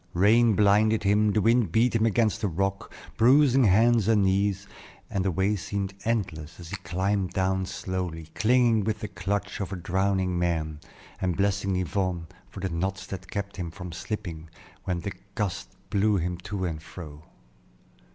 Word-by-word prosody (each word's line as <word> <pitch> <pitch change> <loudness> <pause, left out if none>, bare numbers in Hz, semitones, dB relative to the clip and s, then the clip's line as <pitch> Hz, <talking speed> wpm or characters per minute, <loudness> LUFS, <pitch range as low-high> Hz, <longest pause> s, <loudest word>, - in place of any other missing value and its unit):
Rain 110 +4 +5
blinded 105 +2 +4
him, 105 +1 +3
the 105 -1 +1
wind 115 -5 +3
beat 115 +6 +3
him 115 0 +3
against 110 0 +1
the 105 - +1
rock, 95 +2 -2 0.3
bruising 135 +1 +5
hands 110 +2 +4
and 110 -3 +4
knees, 100 +1 +1 0.5
and 95 - 0
the 95 - +1
way 95 +4 +1
seemed 100 0 -3
endless, 85 -9 -2
as 85 0 -10
he - - -2
climbed 95 +1 -1 0.4
slowly 90 -3 -4
down, 80 - -18
clinging 115 -2 +3
with 105 0 -2
the 105 - -3
clutch 100 +1 -3
of 100 -2 -4
a - - -2
drowning 95 0 0
man, 80 -3 -1 0.4
and 90 -3 0
blessing 100 -1 +1
Yvonne 90 -1 -1 0.2
for 95 - -9
the 95 - -1
knots 95 +3 -2
that 95 -1 -8
kept 100 -1 -4
him 90 -3 -3
from 90 +1 -8
slipping 85 -4 -6 0.4
when 90 -2 -1
the 100 - -4 0.2
gusts 100 -4 -3 0.2
blew 105 +1 +3
him 90 0 -1
to 95 +1 -4
and 80 -3 -4
fro. 75 -3 -10
95 Hz, 170 wpm, -27 LUFS, 90-105 Hz, 0.5 s, Rain